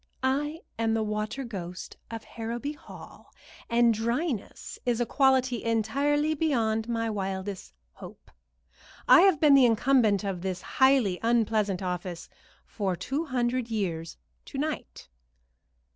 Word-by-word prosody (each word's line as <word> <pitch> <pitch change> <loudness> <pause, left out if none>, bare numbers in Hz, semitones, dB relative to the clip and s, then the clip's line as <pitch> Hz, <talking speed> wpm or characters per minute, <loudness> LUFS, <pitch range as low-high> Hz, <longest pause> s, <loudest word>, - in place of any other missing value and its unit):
I 295 +5 0 0.2
am 225 -1 +1
the 220 - 0
Water 215 +5 -3
Ghost 185 -6 -7
of 225 0 -6
Harrowby 235 +5 -5
Hall, 295 - -14 0.4
and 235 0 +4
dryness 235 - -3
is 240 -1 0
a 240 - +1
quality 260 -1 +2
entirely 280 +7 +1
beyond 235 -8 0
my 230 -1 -1
wildest 195 -2 -4 0.2
hope. - - -13 0.8
I - - +8
have 375 -5 +4
been 300 -2 +6
the 270 -3 +7
incumbent 225 -3 +3
of 195 -3 -3
this 185 -1 -4
highly 265 -9 +3
unpleasant 220 -4 +1
office 180 -1 -4 0.4
for 195 -4 -2
two 280 - -3
hundred 250 -3 -1
years 170 -7 -3 0.3
to - - -8
night." - - -4
230 Hz, 130 wpm, -27 LUFS, 205-265 Hz, 0.8 s, I